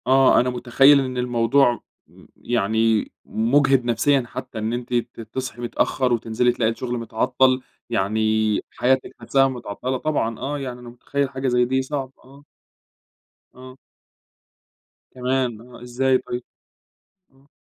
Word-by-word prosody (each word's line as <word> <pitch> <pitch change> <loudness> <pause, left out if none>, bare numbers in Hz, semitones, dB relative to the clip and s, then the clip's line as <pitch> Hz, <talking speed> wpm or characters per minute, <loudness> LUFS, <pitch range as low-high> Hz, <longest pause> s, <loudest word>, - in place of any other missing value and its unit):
آه، 135 0 +5
أنا 125 - +1
متخيّل 125 +3 +5
إن 130 -2 -3
الموضوع 120 +1 +2 0.3
م - - -19
يعني 110 -1 0
مجهد 130 +2 +2
نفسيًا 130 +3 +2
حتّى 110 - -7
إن 110 +2 -2
أنتِ 125 0 -5
ت 120 -1 -2
تصحي 120 +2 -6
متأخّر، 125 +1 0
وتنزلي 120 +1 +1
تلاقي 115 -2 0
الشغل 120 +1 -4
متعطل، 130 +3 +1 0.3
يعني 110 -1 0 0.6
حياتِك 130 +1 +1
حاسّاها 135 -1 +2
متعطلة. 130 0 -4
طبعًا 120 -6 -1
آه، 145 +2 -3
يعني 125 -3 -6
أنا 120 -1 -10
متخيّل 140 +3 -3
حاجة 130 0 -3
زي 125 -1 +3
دي 130 +2 0
صعب، 135 -1 -4
آه. 140 +2 -17 1.1
آه. 130 +1 -12 1.4
كمان! 125 -3 -1
آه، 120 0 -14
إزاي 130 +2 +1
طيب؟ 125 -1 -6 0.9
آه. 135 +2 -27
125 Hz, 135 wpm, -22 LUFS, 120-130 Hz, 1.4 s, آه